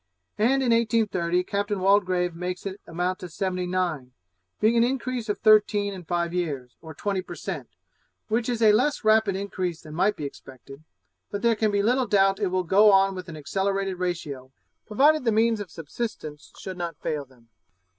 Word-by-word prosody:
And 265 +5 +3
in 245 - +2
1830, 210 -7 +1
Captain 200 +1 -2
Waldegrave 185 -2 +2
makes 180 +2 -5
it 195 +1 -6
amount 180 +2 -2
to 180 - -8
seventy 180 +1 -2
nine; 170 -9 -2 0.5
being 220 +2 +3
an 230 - +5
increase 250 -2 -2
of 205 - 0
thirteen 210 -2 +4
in 185 -3 -9
five 170 0 -1
years, 145 -9 -3
or 160 -2 -10
twenty 195 +3 -2
per - - -9
cent, - - -6 0.6
which 225 +2 0
is 235 -2 0
a 215 - +7
less 255 +7 +1
rapid 215 -2 +3
increase 185 -4 -3
than 155 -1 -11
might 195 +6 +2
be 150 - -5
expected; 135 +1 -11 0.5
but 205 +1 -5
there 235 -1 +4
can 215 0 +1
be 200 -1 +1
little 250 +3 +2
doubt 195 0 +3
it 205 - +1
will 185 0 0
go 205 +5 +5
on 195 0 +4
with 185 -2 -8
an 160 - -8
accelerated 195 +4 -2
ratio, 150 -8 -4 0.4
provided 290 +7 +3
the 230 - +2
means 225 +1 +2
of 205 -3 -6
subsistence 160 -2 -6
should 190 -2 -7
not 170 -3 -4
fail 150 -2 -3
them. 125 -4 -23
195 Hz, 185 wpm, -25 LUFS, 170-215 Hz, 0.6 s, a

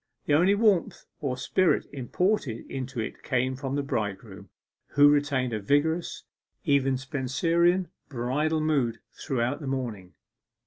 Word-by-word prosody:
The 145 - +1
only 180 +7 +5
warmth 205 -5 +2
or 130 -4 -2
spirit 170 +7 +2
imported 140 - -1
into 130 -1 -4
it 110 - -5
came 130 +1 0
from 135 +1 -4
the 145 - 0
bridegroom, 105 -5 -4 0.4
who 145 0 +7
retained 140 -4 +1
a 110 - -1
vigorous 150 - 0 0.4
even 135 -2 +2
Spenserian 165 +8 +1 0.2
bridal 145 +5 0
mood 135 -7 +1 0.2
throughout 125 +1 -2
the 145 - -6
morning. 115 -9 -4
135 Hz, 130 wpm, -27 LUFS, 125-155 Hz, 0.4 s, who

